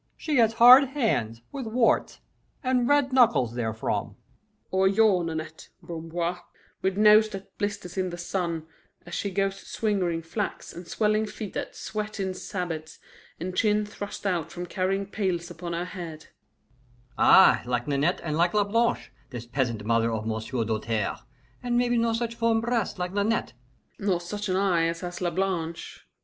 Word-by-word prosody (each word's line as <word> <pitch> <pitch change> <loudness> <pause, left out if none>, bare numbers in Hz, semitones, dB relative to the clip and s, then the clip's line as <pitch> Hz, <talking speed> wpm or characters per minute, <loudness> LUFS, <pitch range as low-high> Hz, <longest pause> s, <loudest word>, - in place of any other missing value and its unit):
She 305 -3 -1
has 225 -2 +4
hard 250 +4 +9
hands, 125 - -1
with 265 -4 -5
warts, 230 +1 +1 0.4
and 255 -2 +1
red 285 -2 +3
knuckles 235 - +4
therefrom 110 -2 -2 0.3
" - - -44
"Or 190 0 +3
your 200 -2 +4
Nanette, 160 -1 -6
Bamboir, 170 +1 -3 0.4
with 190 0 0
nose 215 +1 +6
that 195 -2 -9
blisters 200 -3 -3
in 185 -1 0
the 175 - -7
summer, 170 -2 -2 0.4
as - - -10
she 200 - -2
goes 195 0 -1
swingeing 185 -6 -1
flax, 205 +5 -4
and 175 0 -10
swelling 215 +4 +1
feet 210 -1 -7
that - - -5
sweat 215 0 -5
in 190 -1 -1
sabots, 170 -4 -5 0.4
and 180 +2 -4
chin 210 0 +2
thrust 205 0 -8
out 175 -5 -1
from 175 0 -5
carrying 190 +2 -1
pails 185 -4 -2
upon 170 0 -6
her 170 +1 -2
head 170 -5 -8 0.5
" 125 -1 -33
"Ay, - - +7
like 120 -1 -1
Nanette 145 +5 +1
and 155 -2 -2
like 175 +4 +2
Lablanche, 225 +3 +1 0.2
this 120 -3 -7
peasant 120 -4 -2
mother 115 0 +2
of 110 -1 -3
M'sieu' 110 +2 -2
Doltaire, 110 -1 -2 0.4
and 245 -1 0
maybe 245 0 +2
no 230 0 +1
such 230 0 -2
firm 230 -1 +1
breasts 230 -2 -1
like 180 0 -3
Nanette 205 +3 0 0.3
" - - -41
"Nor 195 -3 +1
such 205 +4 -5
an 185 - +1
eye 185 -4 +2
as 165 0 -3
has 175 0 -6
Lablanche. 170 -2 -3
185 Hz, 165 wpm, -26 LUFS, 165-215 Hz, 0.5 s, hard